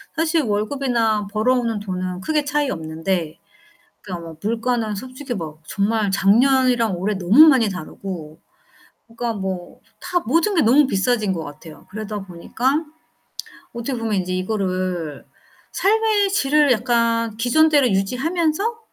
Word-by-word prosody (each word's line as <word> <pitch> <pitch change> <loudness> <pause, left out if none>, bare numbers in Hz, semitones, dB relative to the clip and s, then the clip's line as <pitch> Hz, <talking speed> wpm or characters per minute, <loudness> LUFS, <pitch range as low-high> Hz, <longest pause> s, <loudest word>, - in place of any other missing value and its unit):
사실 325 0 +1
월급이나 220 -1 0
벌어오는 230 +1 +1
돈은 185 -2 -4
크게 300 +7 0
차이 290 -1 0
없는데 160 -2 -3 0.6
그러니까 175 -4 -7
뭐 160 - -10
물가는 225 0 -1
솔직히 255 +4 -6
막 160 -5 -7
정말 210 0 0
작년이랑 235 +2 +3
올해 205 +4 -1
너무 200 - +6
많이 255 -7 +4
다르고 170 -3 -7 0.7
그러니까 230 0 -4
뭐 190 -3 -5 0.2
다 355 - -1
모든 335 - +1
게 335 - +3
너무 265 +6 +5
비싸진 215 -2 0
것 170 -3 -4
같아요. 150 +1 -12
그러다 210 0 -5
보니까 240 - -2 0.9
어떻게 235 +2 -4
보면 225 -2 -2
인제 185 -1 -2
이거를 185 -5 -2 0.5
'삶의 425 0 +2
질을 295 -6 +3
약간 230 -2 +1
기존대로 285 +4 +3
유지하면서 315 - 0
225 Hz, 300 characters per minute, -21 LUFS, 190-270 Hz, 0.9 s, 너무